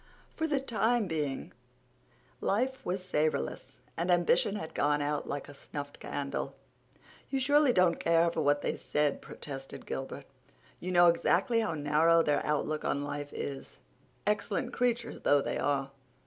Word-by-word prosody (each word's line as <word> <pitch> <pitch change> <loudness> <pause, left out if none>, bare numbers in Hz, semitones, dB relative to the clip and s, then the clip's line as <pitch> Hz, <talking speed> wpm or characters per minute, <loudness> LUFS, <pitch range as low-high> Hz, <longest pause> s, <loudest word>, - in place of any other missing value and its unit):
For 320 - 0
the 290 -3 +1
time 235 -2 +1
being 150 -6 -3 0.9
life 255 +6 0
was 185 +1 -2
savorless, 155 - -1
and 170 +2 -2
ambition 175 +2 +3
had 160 -6 -5
gone 145 0 +2
out 145 0 -2
like 145 - -4
a 145 - -10
snuffed 145 0 -7
candle. 140 -1 -4 0.7
"You 270 - 0
surely 285 +1 +4
don't 180 -5 +3
care 165 0 +3
for 160 - -1
what 145 0 +2
they - - 0
said," 150 -1 0
protested 135 -2 -8
Gilbert. 135 - -5 0.5
"You 185 - -4
know 175 -1 +6
exactly 175 +6 +3
how 215 -7 0
narrow 155 +3 +4
their 145 -2 +1
outlook 150 +1 -1
on 140 - 0
life 145 0 -5
is, 135 -1 -6 0.5
excellent 210 +4 -1
creatures 245 -1 0
though 145 - +4
they - - -2
are. 140 -1 0
165 Hz, 150 wpm, -31 LUFS, 145-210 Hz, 0.9 s, know